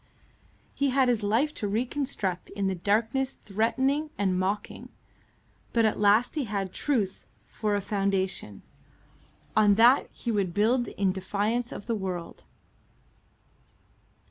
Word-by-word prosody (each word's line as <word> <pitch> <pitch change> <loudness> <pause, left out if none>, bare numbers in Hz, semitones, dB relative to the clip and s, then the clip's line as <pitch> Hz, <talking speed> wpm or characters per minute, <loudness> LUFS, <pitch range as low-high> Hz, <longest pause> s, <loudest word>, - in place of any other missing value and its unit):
He 280 0 +1
had 260 -1 +3
his 235 -3 +1
life 230 +9 +1
to 205 - -3
reconstruct 220 -4 -2
in 200 -1 -3
the 190 - +1
darkness 225 +8 0
threatening 265 +9 0
and 190 -2 +1
mocking; 195 +3 -3 0.8
but 230 -1 +3
at 215 - +1
last 210 +4 +4
he 295 -4 -1
had 200 -3 -3
truth 220 -10 -1 0.2
for 210 -2 -2
a 200 - 0
foundation; 195 - -2 0.9
on 210 -2 +5
that 240 +5 +5
he 235 - -4
would 195 -5 -1
build 240 +4 +2
in 195 -1 0
defiance 205 +5 -1
of - - -7
the 230 - -1
world. 185 -5 -5
210 Hz, 130 wpm, -27 LUFS, 195-245 Hz, 0.9 s, on